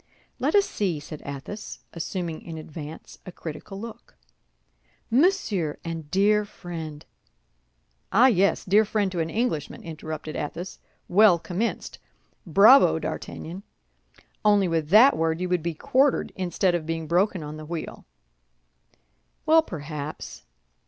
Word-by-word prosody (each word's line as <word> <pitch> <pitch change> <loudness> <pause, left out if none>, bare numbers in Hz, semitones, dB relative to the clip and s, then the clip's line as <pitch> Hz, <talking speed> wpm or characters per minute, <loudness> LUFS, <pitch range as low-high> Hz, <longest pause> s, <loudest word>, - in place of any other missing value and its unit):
"Let - - +1
us 405 -1 +5
see," 180 -7 -1
said 150 +1 -9
Athos, 140 +9 -7
assuming 170 -1 -4
in 165 -2 -8
advance 155 0 -9
a 185 - -9
critical 170 +4 -8
look. 230 +1 -10 1.0
"Monsieur 235 - +2
and 165 -3 -5
dear 210 +4 +3
friend—" 165 -6 -8 1.1
"Ah, 225 +6 +6
yes! 200 -6 +3
Dear 205 +3 +5
friend 205 -2 0
to 180 - -3
an 165 0 -1
Englishman," 210 - -2
interrupted 155 -1 -6
Athos; 170 +5 -5 0.3
"well 200 -1 +6
commenced! 180 +7 -3 0.5
Bravo, 210 - +7
D'Artagnan! 175 +4 -6 0.8
Only 205 -3 +4
with 165 -3 -1
that 230 +9 +7
word 160 0 0
you 180 - -1
would 180 -2 +1
be 170 0 -3
quartered 265 - +1
instead 185 0 0
of 165 -2 -2
being 165 0 -2
broken 180 +1 +1
on 150 +1 -7
the 155 - -8
wheel." 165 -1 -6 1.4
"Well, 320 +1 +6
perhaps. 150 - -7
175 Hz, 130 wpm, -25 LUFS, 160-205 Hz, 1.4 s, Bravo